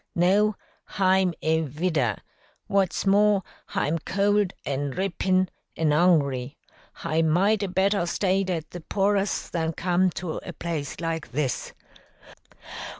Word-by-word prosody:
"No, 200 +4 +3 0.4
hi'm 190 -2 +3
a 160 +1 +2
vidder. 150 - 0 0.5
What's 195 -1 0
more, 200 0 +4 0.2
hi'm 165 +3 -1
cold, 200 +2 +1
and 140 0 -2
drippin', 185 +1 +1 0.3
an' 155 -2 +2
'ungry. 145 -6 +2 0.4
Hi 160 +1 -1
might 190 +7 +3
'a' 200 - 0
better 190 0 +1
stayed 190 +1 0
at 165 -4 -3
the 175 - -7
poor 200 +4 +1
us 200 0 -1
than 165 -1 -2
come 180 +2 +2
to 170 -2 -3
a - - -7
place 160 -4 -4
like 165 -2 -3
this." 140 -2 -2
175 Hz, 130 wpm, -25 LUFS, 160-195 Hz, 0.5 s, more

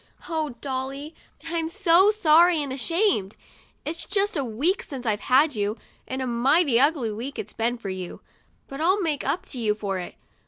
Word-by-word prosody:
Oh, 315 -6 -2
Dolly, 275 +3 -4 0.3
I'm 330 -1 -2
so 370 +1 +4
sorry 345 -4 +5
and 280 -3 -3
ashamed! 280 - 0 0.5
It's 330 +2 -4
just 405 +1 0
a 285 - 0
week 270 - 0
since 260 -3 -8
I've 210 -2 +1
had 280 +6 +3
you, 210 0 -1 0.3
and 260 0 -3
a - - -2
mighty 255 +3 +3
ugly 280 -5 +2
week 240 +7 -6
it's 210 - -6
been 235 +2 -1
for 210 -4 -6
you; 185 -1 -6 0.5
but 275 +2 -7
I'll 370 +5 +3
make 315 -7 -1
up 290 +7 -1
to 255 - -5
you 215 -2 +1
for 200 -3 -3
it. 180 - -7
275 Hz, 185 wpm, -25 LUFS, 235-330 Hz, 0.5 s, sorry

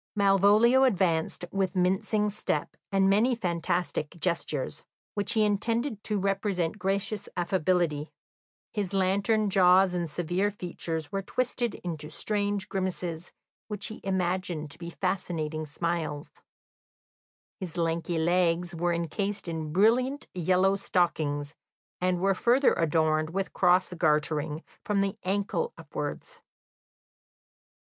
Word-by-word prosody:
Malvolio 205 +6 +5
advanced 180 -8 +1
with 195 -1 -1
mincing 190 +3 +1
step 210 - -2 0.2
and 195 -1 +3
many 220 +6 +3
fantastic 175 -4 -2
gestures, 155 -4 -2 0.3
which 205 +2 0
he 220 -2 +3
intended 225 +2 -1
to 210 - -1
represent 195 -2 -1
gracious 200 +1 -1
affability; 175 -4 0 0.6
his 205 -3 -2
lantern 200 +3 +2
jaws 185 -1 +5
and 175 -2 -2
severe 175 +5 0
features 165 -5 -5
were 195 - -1
twisted 240 +2 -1
into 160 -4 -4
strange 205 +3 -1
grimaces, 180 -3 -3 0.4
which 210 -2 -3
he 220 - -9
imagined 180 -5 -1
to 160 - -7
be 170 -1 -6
fascinating 165 -4 -2
smiles; 155 -1 -3 1.3
his 180 -3 -6
lanky 165 0 0
legs 175 +1 +1
were 170 +1 0
encased 195 +4 -2
in 160 -2 -4
brilliant 245 - +3
yellow 185 +2 +3
stockings, 155 -6 0 0.5
and 180 0 +1
were 195 +2 +3
further 245 +8 +3
adorned 155 -1 +1
with 195 +3 -3
cross 180 0 +3
gartering 155 -1 0 0.2
from 205 -1 +1
the 195 +1 -1
ankle 205 - -1
upwards. - - -6
185 Hz, 115 wpm, -28 LUFS, 165-200 Hz, 1.3 s, Malvolio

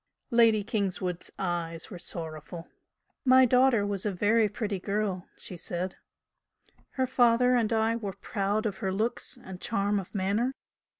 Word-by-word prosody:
Lady 230 -3 +5
Kingswood's 185 -4 -2
eyes 170 -2 -3
were 180 - -7
sorrowful. 165 0 -7 0.6
"My 260 0 +7
daughter 250 -3 +4
was 200 -2 -2
a 210 - 0
very 210 +3 +3
pretty 205 -2 -3
girl," 200 -1 -2
she 185 - -8
said 175 +2 -3 1.0
"Her 260 - +1
father 250 -1 +4
and 230 -3 +1
I 225 0 +2
were 205 -4 -4
proud 205 0 -2
of 205 -3 -2
her 190 - -2
looks 220 +5 -2
and 245 - -18 0.2
her - - -1
charm 205 -1 +1
of 190 +2 -9
manner. 205 +7 +1
205 Hz, 155 wpm, -28 LUFS, 185-230 Hz, 1.0 s, My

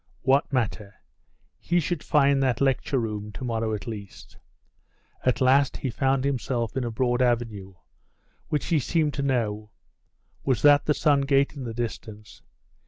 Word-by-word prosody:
What 135 +2 +2
matter? 110 -5 -2 0.6
He 175 - +1
should 170 -1 -2
find 140 -2 +3
that 130 -4 +1
lecture 135 0 +1
room 105 -3 -3
to - - -8
morrow 115 -2 -1
at 100 - -8
least. 105 -4 -9 0.9
At 125 0 +1
last 135 +2 +3
he 130 - -3
found 135 +2 +1
himself 125 -4 -2
in 130 - -1
a 120 - -2
broad 120 +2 0
avenue, 115 -6 -1 0.7
which 150 -2 -1
he 165 -3 +2
seemed 155 +1 0
to 140 - -3
know. 110 -6 -1 0.7
Was 130 -4 0
that 145 -1 +6
the 150 - +2
Sun 145 -2 +3
gate 140 0 +3
in 135 -3 -6
the 115 - -5
distance? 110 -2 -6
130 Hz, 160 wpm, -25 LUFS, 115-140 Hz, 0.9 s, that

